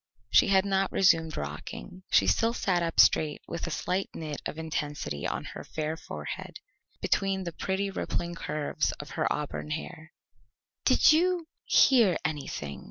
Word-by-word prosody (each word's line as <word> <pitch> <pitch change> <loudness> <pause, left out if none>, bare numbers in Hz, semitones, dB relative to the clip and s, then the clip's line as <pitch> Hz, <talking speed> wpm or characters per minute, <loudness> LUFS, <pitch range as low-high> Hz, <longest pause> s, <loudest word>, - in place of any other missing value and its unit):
She - - +6
had 195 -1 +4
not 195 -1 +1
resumed 165 -4 +3
rocking. 75 - -7
She - - +5
still 230 +1 +2
sat 180 -6 +1
up 165 -1 -2
straight 150 -2 +5
with 170 - -4
a - - -2
slight 185 +4 -2
knit 155 -3 -5
of - - -6
intensity 150 - -3
on - - -3
her - - -7
fair 155 0 -3
forehead, 75 - -7 0.5
between 195 -1 +1
the 170 - -4
pretty 195 +4 -2
rippling 175 -2 -3
curves 155 -2 -2
of 145 - -9
her - - -1
auburn 150 0 -3
hair. 155 +1 -6 0.7
"Did 260 +4 +6
you 350 +1 +2 0.2
hear 230 - +5
anything?" 140 - -4
165 Hz, 155 wpm, -28 LUFS, 150-195 Hz, 0.7 s, She